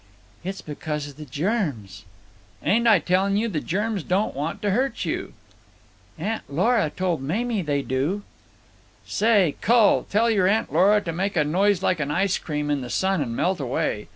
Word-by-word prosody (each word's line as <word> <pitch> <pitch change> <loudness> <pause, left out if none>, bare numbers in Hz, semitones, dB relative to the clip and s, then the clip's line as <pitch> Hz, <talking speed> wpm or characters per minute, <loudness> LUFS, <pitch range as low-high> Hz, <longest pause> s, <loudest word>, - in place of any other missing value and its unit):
"It's 190 +2 -5
because 150 0 -4
of 140 - -14
the 155 - -8
germs." 140 - -3 0.6
"Ain't 235 +3 +2
I 215 -3 +7
telling 190 +4 +1
you 225 +2 +1
the 175 -9 -2
germs 205 +2 -1
don't 185 +6 0
want 160 +8 -3
to 205 - +1
hurt 260 +7 0
you?" - - -3 0.8
"Aunt 215 +7 -2
Lora 205 - +2
told 175 -2 -2
Mamie 215 - -1
they 145 -4 -1
do." 145 +11 -1 0.8
"Say, 205 -8 +2
cull, 230 -1 +5
you - - -13
tell 230 +3 +2
your 195 -4 +3
Aunt 215 +3 +1
Lora 205 +3 +4
to 175 -5 -4
make 190 +2 -2
a 150 - +4
noise 190 +5 +1
like 180 -3 +1
an 145 -2 -2
ice 190 +5 +1
cream 150 -2 -3
in 145 -2 0
the 125 - -6
sun 190 +2 +1
and 115 -4 -3
melt 185 +5 0
away. 120 -5 -2
185 Hz, 180 wpm, -24 LUFS, 150-205 Hz, 0.8 s, I